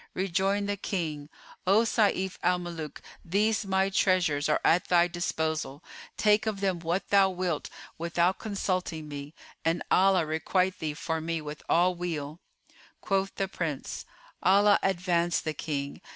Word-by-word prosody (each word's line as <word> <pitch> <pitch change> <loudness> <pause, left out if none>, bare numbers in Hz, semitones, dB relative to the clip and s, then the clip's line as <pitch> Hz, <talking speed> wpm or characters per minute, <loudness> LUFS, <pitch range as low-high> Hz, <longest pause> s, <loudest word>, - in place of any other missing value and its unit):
Rejoined 195 +2 0
the 205 0 -1
King, 155 -7 -3 0.4
"O 205 +4 +5
Sayf 200 -5 +1
al 180 +1 +3
Muluk 170 -3 -7 0.2
these 210 +4 +1
my 190 0 +2
treasures 175 -7 +2
are 150 - +3
at 175 - +4
thy 175 -1 +4
disposal: 160 -4 -2 0.3
take 210 +2 +3
of 210 -2 -1
them 190 -3 0
what 170 +3 -2
thou 195 -1 +5
wilt, 180 -4 -2 0.3
without 170 +2 +1
consulting 185 -6 -2
me, 145 +1 -8 0.3
and 165 +1 0
Allah 190 -2 +4
requite 180 +4 0
thee 155 -2 -3
for 160 +1 -2
me 165 +1 -2
with 150 0 -7
all 180 +2 +4
weal!" 165 -3 -4 0.6
Quoth 195 0 -1
the 195 - -1
Prince, 165 -7 -4 0.4
"Allah 200 +2 +5
advance 175 -2 +1
the 155 - -3
King! 140 -2 -4
175 Hz, 145 wpm, -28 LUFS, 160-195 Hz, 0.6 s, O